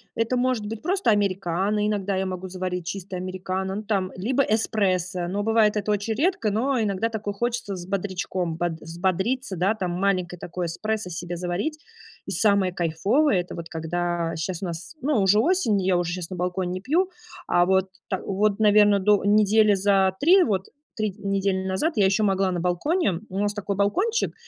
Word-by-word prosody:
Это 230 Hz, +2 st, 0 dB
может 250 Hz, -3 st, 0 dB
быть 220 Hz, 0 st, -6 dB
просто 375 Hz, 0 st, 0 dB
американо, 195 Hz, 0 st, +1 dB
иногда 205 Hz, -2 st, -1 dB
я 190 Hz, 0 st, 0 dB
могу 185 Hz, 0 st, -5 dB
заварить 180 Hz, -1 st, -4 dB
чисто 190 Hz, -1 st, -5 dB
американо, 185 Hz, +1 st, -3 dB
ну, 210 Hz, -, -4 dB
там, 200 Hz, -3 st, -1 dB
либо 245 Hz, +9 st, 0 dB
эспрессо, 185 Hz, -6 st, 0 dB
но 200 Hz, +3 st, -2 dB
бывает 220 Hz, -1 st, +3 dB
это 210 Hz, 0 st, -1 dB
очень 210 Hz, +2 st, 0 dB
редко, 270 Hz, -, +1 dB
но 250 Hz, +5 st, 0 dB
иногда 210 Hz, +1 st, 0 dB
такое 210 Hz, -2 st, -4 dB
хочется 235 Hz, -1 st, -2 dB
с 175 Hz, -1 st, -7 dB
бодрячком, 185 Hz, -3 st, -2 dB
бод 175 Hz, +1 st, -1 dB
взбодриться, 190 Hz, -, -2 dB
да, 190 Hz, +6 st, +2 dB
там, 185 Hz, -5 st, -3 dB
маленькое 185 Hz, -3 st, 0 dB
такое 175 Hz, +1 st, -4 dB
эспрессо 215 Hz, +3 st, -3 dB
себе 175 Hz, +1 st, -5 dB
заварить. 180 Hz, -, -2 dB, 0.5 s
И -, -, -6 dB
самое 200 Hz, 0 st, +3 dB
кайфовое- 185 Hz, -, +1 dB
это 175 Hz, -, -9 dB
вот 170 Hz, -1 st, -7 dB
когда 170 Hz, +1 st, -2 dB
щас 175 Hz, +2 st, -3 dB
у -, -, -1 dB
нас, 170 Hz, -, -6 dB
ну, 295 Hz, +3 st, +1 dB
уже 195 Hz, +2 st, +4 dB
осень, 235 Hz, -, +2 dB
и -, -, -3 dB
я 185 Hz, -2 st, +3 dB
уже 175 Hz, -1 st, -1 dB
щас 180 Hz, -2 st, -5 dB
на 185 Hz, -, -6 dB
балконе 180 Hz, 0 st, -2 dB
не 185 Hz, -, -3 dB
пью, 340 Hz, -, +1 dB, 0.4 s
а 175 Hz, -, +3 dB
вот 190 Hz, +1 st, +2 dB, 0.2 s
та 190 Hz, -, -2 dB
вот, 200 Hz, +1 st, 0 dB
наверно, 210 Hz, -1 st, +5 dB
до 205 Hz, 0 st, +3 dB
недели 210 Hz, +1 st, +4 dB
за 195 Hz, -1 st, +2 dB
3 365 Hz, +6 st, +6 dB
вот, 195 Hz, -, -1 dB, 0.3 s
3 215 Hz, -2 st, -1 dB
недели 195 Hz, -2 st, -1 dB
назад 190 Hz, -, 0 dB
я 205 Hz, -, +3 dB
ещё 195 Hz, +3 st, +2 dB
могла 195 Hz, -1 st, +1 dB
на 175 Hz, -, -2 dB
балконе. 180 Hz, -, 0 dB
У 190 Hz, +1 st, -4 dB
нас 205 Hz, 0 st, 0 dB
такой 200 Hz, -1 st, -3 dB
балкончик, 380 Hz, -, +1 dB
195 Hz, 190 wpm, -24 LUFS, 180-215 Hz, 0.5 s, 3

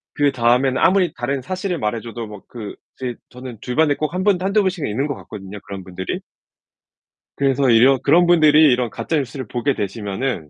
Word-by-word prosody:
그다음에는 130 Hz, -2 st, +2 dB
아무리 180 Hz, -1 st, +3 dB
다른 130 Hz, +3 st, -3 dB
사실을 185 Hz, +5 st, -3 dB
말해줘도 115 Hz, +1 st, -4 dB
뭐 105 Hz, -2 st, -10 dB
그 110 Hz, -4 st, -8 dB, 0.2 s
제 125 Hz, -2 st, -3 dB
저는 125 Hz, -3 st, -10 dB
주변에 145 Hz, +3 st, +1 dB
꼭 155 Hz, +3 st, -3 dB
1 185 Hz, +1 st, -2 dB
분, 205 Hz, -3 st, +4 dB
1-2 200 Hz, +3 st, +2 dB
분씩은 185 Hz, -5 st, -1 dB
있는 130 Hz, +8 st, -1 dB
것 140 Hz, -, -3 dB
같거든요, 100 Hz, -1 st, -9 dB
그런 100 Hz, -1 st, -8 dB
분들이. 95 Hz, 0 st, -5 dB, 1.2 s
그래서 135 Hz, -1 st, +2 dB
이런 125 Hz, +3 st, +5 dB
그런 170 Hz, +5 st, +5 dB
분들이 155 Hz, -3 st, +6 dB
이런 125 Hz, -1 st, +1 dB
가짜 160 Hz, -, -3 dB
뉴스를 135 Hz, -3 st, -4 dB
보게 125 Hz, +6 st, -1 dB
되시면은 100 Hz, -, -3 dB
130 Hz, 370 characters per minute, -20 LUFS, 115-155 Hz, 1.2 s, 분들이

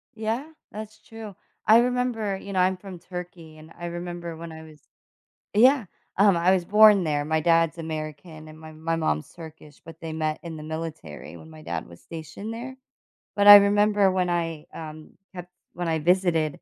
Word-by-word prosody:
Yeah, 225 Hz, +5 st, -3 dB, 0.3 s
that's 215 Hz, 0 st, -9 dB
true. 220 Hz, -4 st, -10 dB, 0.3 s
I 220 Hz, +3 st, +7 dB
remember, 240 Hz, -5 st, -1 dB
you 200 Hz, 0 st, -9 dB
know, 185 Hz, -, 0 dB
I'm 185 Hz, +1 st, +2 dB
from 185 Hz, -2 st, -10 dB
Turkey 180 Hz, -3 st, -9 dB
and 155 Hz, +1 st, -15 dB
I 175 Hz, -, -6 dB
remember 175 Hz, -1 st, -6 dB
when 165 Hz, 0 st, -8 dB
I 160 Hz, 0 st, -10 dB
was 155 Hz, -1 st, -15 dB, 0.7 s
Yeah, 250 Hz, +2 st, +5 dB, 0.3 s
um, 200 Hz, -2 st, +5 dB
I 175 Hz, +2 st, +3 dB
was 180 Hz, -2 st, 0 dB
born 210 Hz, -1 st, +6 dB
there, 145 Hz, -2 st, -1 dB
my 160 Hz, +1 st, 0 dB
dad's 165 Hz, 0 st, +2 dB
American 155 Hz, 0 st, -7 dB
and 155 Hz, 0 st, -13 dB
my 160 Hz, 0 st, -11 dB
my 160 Hz, +1 st, -3 dB
mom's 75 Hz, -, -2 dB
Turkish, 160 Hz, -3 st, -13 dB
but 165 Hz, -1 st, -12 dB
they 160 Hz, -1 st, -6 dB
met 155 Hz, -1 st, -2 dB
in 165 Hz, -2 st, -7 dB
the 150 Hz, -, -9 dB
military 160 Hz, 0 st, -7 dB
when 160 Hz, -, -14 dB
my 155 Hz, -1 st, -13 dB
dad -, -, -5 dB
was 85 Hz, 0 st, -15 dB
stationed 165 Hz, +7 st, -8 dB
there, 250 Hz, +3 st, -7 dB, 0.6 s
but 205 Hz, 0 st, +2 dB
I 205 Hz, 0 st, +13 dB
remember 205 Hz, -1 st, +4 dB
when 185 Hz, -1 st, 0 dB
I, 165 Hz, -3 st, -3 dB
um, 155 Hz, -1 st, -9 dB, 0.2 s
ha 180 Hz, -, -6 dB, 0.3 s
when 175 Hz, -1 st, -4 dB
I 160 Hz, -1 st, 0 dB
visited. 175 Hz, -1 st, +2 dB
170 Hz, 190 wpm, -25 LUFS, 160-200 Hz, 0.7 s, I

